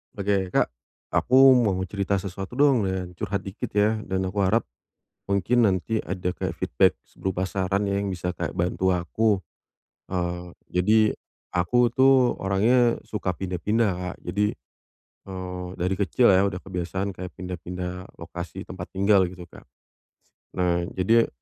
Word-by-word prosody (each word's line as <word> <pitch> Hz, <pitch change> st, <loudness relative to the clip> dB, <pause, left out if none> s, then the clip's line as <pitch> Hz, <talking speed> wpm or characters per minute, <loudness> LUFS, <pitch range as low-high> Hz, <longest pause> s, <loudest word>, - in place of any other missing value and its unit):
Oke. 100 Hz, -2 st, 0 dB
Kak, -, -, +2 dB, 0.4 s
aku 135 Hz, +1 st, +6 dB
mau 105 Hz, -6 st, +2 dB
cerita 100 Hz, +1 st, -1 dB
sesuatu 95 Hz, +3 st, -5 dB
dong, 135 Hz, -6 st, +4 dB
dan 95 Hz, -1 st, -3 dB
curhat 100 Hz, +3 st, -2 dB
dikit 95 Hz, +1 st, -5 dB
ya, 105 Hz, +2 st, +3 dB
dan 95 Hz, 0 st, -1 dB
aku 100 Hz, +2 st, -3 dB
harap, 110 Hz, +5 st, +2 dB, 0.6 s
mungkin 110 Hz, +5 st, +3 dB
nanti 100 Hz, +3 st, 0 dB
ada 90 Hz, -1 st, -2 dB
kayak -, -, -3 dB
feedback, -, -, +3 dB
s -, -, -31 dB
berupa 95 Hz, -1 st, -2 dB
saran 95 Hz, +1 st, 0 dB
ya 100 Hz, -, 0 dB
yang 100 Hz, -, -1 dB
bisa 90 Hz, 0 st, -3 dB
kayak -, -, -3 dB
bantu 90 Hz, +2 st, +1 dB
aku. 100 Hz, +4 st, +1 dB, 0.7 s
Eee, 90 Hz, -1 st, -3 dB, 0.2 s
jadi, 100 Hz, +5 st, +3 dB, 0.6 s
aku 120 Hz, +8 st, +3 dB
tuh 130 Hz, -1 st, +5 dB
orangnya, 115 Hz, +5 st, +3 dB
suka 105 Hz, -3 st, -2 dB
pindah-pindah, 95 Hz, +5 st, 0 dB
Kak. 90 Hz, +1 st, -5 dB
Jadi, 105 Hz, +4 st, +1 dB, 0.8 s
eee, 90 Hz, -1 st, -5 dB
dari 90 Hz, +2 st, 0 dB
kecil 120 Hz, +4 st, +3 dB
ya, 95 Hz, -, +5 dB
udah 95 Hz, -, -5 dB
kebiasaan 95 Hz, +1 st, -3 dB
kayak 90 Hz, 0 st, -7 dB
pindah-pindah, 90 Hz, 0 st, -6 dB
lokasi 85 Hz, +3 st, -7 dB
tempat 90 Hz, -1 st, -7 dB
tinggal, 100 Hz, 0 st, +4 dB
gitu, 90 Hz, -1 st, -10 dB
Kak. 85 Hz, -, -16 dB
S -, -, -44 dB, 0.9 s
nah 90 Hz, -1 st, +2 dB, 0.2 s
jadi, 115 Hz, +5 st, +4 dB
95 Hz, 150 wpm, -25 LUFS, 90-105 Hz, 0.9 s, aku